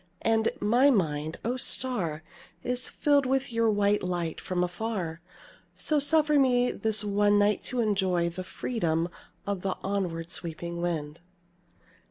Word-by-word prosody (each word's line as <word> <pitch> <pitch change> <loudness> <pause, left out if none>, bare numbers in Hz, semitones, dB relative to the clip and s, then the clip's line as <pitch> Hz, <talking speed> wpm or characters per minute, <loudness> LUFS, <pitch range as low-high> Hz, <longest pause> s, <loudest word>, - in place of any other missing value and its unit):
And 225 0 +2
my 240 +7 +4
mind, 155 - 0
O 245 +3 0
Star! 185 -13 0 0.4
is 250 +1 -2
filled 285 -2 +2
with 265 -1 0
your 230 0 +2
white 205 0 +2
light, 175 -3 -3
from 180 -1 -1
far, 180 -4 -4 0.5
So 305 -1 +1
suffer 300 0 +3
me 250 -2 +3
this 215 -1 +2
one 205 0 +3
night 205 0 +2
to 250 -1 0
enjoy 190 -5 +1
The 180 +2 -6
freedom 170 -6 -1 0.4
of 200 -2 -2
the 190 0 -2
onward 175 -4 -2
sweeping 170 0 -4
wind. 160 -3 -3
205 Hz, 140 wpm, -28 LUFS, 170-245 Hz, 0.5 s, my